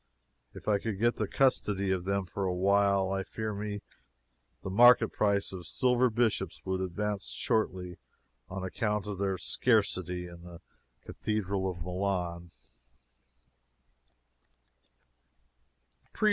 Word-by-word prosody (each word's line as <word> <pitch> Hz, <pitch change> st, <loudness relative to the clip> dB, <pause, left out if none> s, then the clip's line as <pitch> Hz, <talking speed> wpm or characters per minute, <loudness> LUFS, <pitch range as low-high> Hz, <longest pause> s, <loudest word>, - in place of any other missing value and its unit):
If -, -, -11 dB
I 105 Hz, -2 st, +3 dB
could 110 Hz, -1 st, -3 dB
get 120 Hz, +3 st, +2 dB
the 110 Hz, -, -1 dB
custody 100 Hz, -6 st, +1 dB
of 90 Hz, -2 st, -1 dB
them 100 Hz, 0 st, 0 dB
for 95 Hz, +2 st, -3 dB
a 90 Hz, -1 st, 0 dB
while, 100 Hz, 0 st, +3 dB
I 95 Hz, 0 st, 0 dB
fear 110 Hz, +2 st, -4 dB
me 105 Hz, 0 st, -4 dB, 0.8 s
the 95 Hz, -, -4 dB
market 120 Hz, +2 st, +7 dB
price 100 Hz, -2 st, +1 dB
of 90 Hz, -3 st, -7 dB
silver 125 Hz, +3 st, +2 dB
bishops 110 Hz, -6 st, 0 dB
would 95 Hz, 0 st, -1 dB
advance 100 Hz, +2 st, -2 dB
shortly, 95 Hz, -6 st, -1 dB, 0.5 s
on 95 Hz, 0 st, -5 dB
account 105 Hz, +2 st, -1 dB
of 100 Hz, -2 st, -5 dB
their 100 Hz, -1 st, 0 dB
exceeding -, -, -4 dB
scarcity 90 Hz, -1 st, +2 dB
in 85 Hz, -1 st, -11 dB
the 85 Hz, -1 st, -11 dB, 0.5 s
Cathedral 100 Hz, -3 st, -2 dB
of 85 Hz, -3 st, -6 dB
Milan. 90 Hz, -2 st, -2 dB
100 Hz, 125 wpm, -30 LUFS, 90-105 Hz, 0.8 s, market